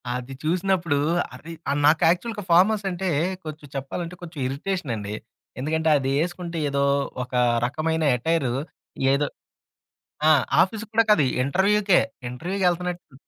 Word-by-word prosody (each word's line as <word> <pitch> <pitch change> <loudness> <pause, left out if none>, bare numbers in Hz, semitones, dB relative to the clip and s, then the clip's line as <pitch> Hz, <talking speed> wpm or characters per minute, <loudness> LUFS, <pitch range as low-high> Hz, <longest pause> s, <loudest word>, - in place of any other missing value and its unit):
అది 125 +1 -6
చూసినప్పుడు 175 -2 +1 0.4
అరె 155 +6 -10 0.2
ఆ! - - +2
నాకు 155 +1 +5
యాక్చువల్‌గా 210 +5 -1
ఫార్మల్స్ 200 +4 +4
అంటే 185 +1 -2 0.4
కొంచెం 155 -1 -8
చెప్పాలంటే 165 +6 -4
కొంచెం 165 -3 -9
ఇరిటేషనండి. 135 - -3 0.4
ఎందుకంటే, 160 +4 0
అదేసుకుంటే 165 +6 -2
ఏదో 140 0 0 0.4
ఒక 125 - -13 0.3
రకమైన 160 +5 -1
ఎటైరు 140 -1 0 0.6
ఏదో 145 +1 +1 1.0
ఆ! - - +8 0.3
ఆఫీసుకి 215 +3 -5
కూడా 230 +1 +5
కాదు 170 -8 +5 0.2
ఇంటర్వ్యూకే, 195 +5 +3 0.3
ఇంటర్వ్యూకెళ్తన్నట్టు. 180 +3 -2
165 Hz, 115 wpm, -24 LUFS, 140-185 Hz, 1.0 s, ఆ